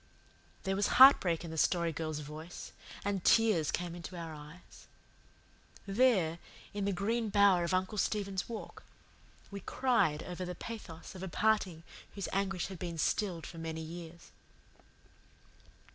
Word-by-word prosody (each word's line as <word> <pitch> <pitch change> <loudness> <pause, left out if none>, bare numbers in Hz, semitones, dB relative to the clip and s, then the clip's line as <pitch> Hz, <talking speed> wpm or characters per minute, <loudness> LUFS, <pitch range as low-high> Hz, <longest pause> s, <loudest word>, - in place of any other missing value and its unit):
There 190 0 0
was 200 +1 +2
heartbreak 185 - +7
in 165 - -6
the 160 - -3
Story 170 0 +2
Girl's 155 -1 -3
voice 155 +4 -8 0.3
and 200 -3 -1
tears 215 -9 +4
came 175 -1 -2
into 175 +1 -8
our 165 -2 -6
eyes. 150 +4 -13 1.0
There, 195 -6 +3 0.3
in 205 -1 -2
the 200 - +1
green 220 +4 -1
bower 200 -3 +5
of 170 - -1
Uncle 185 +3 0
Stephen's 200 -2 -1
Walk, 230 - -7 0.7
we 200 - -5
cried 195 - +1
over 180 0 -5
the 180 0 -5
pathos 190 -8 -8
of 185 - -9
a 190 - -4
parting 190 -4 +1 0.3
whose 200 -2 -3
anguish 195 -1 0
had 190 -3 -8
been 170 -2 -4
stilled 175 +1 0
for 165 - -9
many 160 0 -4
years. 170 +1 -9
180 Hz, 145 wpm, -33 LUFS, 165-200 Hz, 1.0 s, heartbreak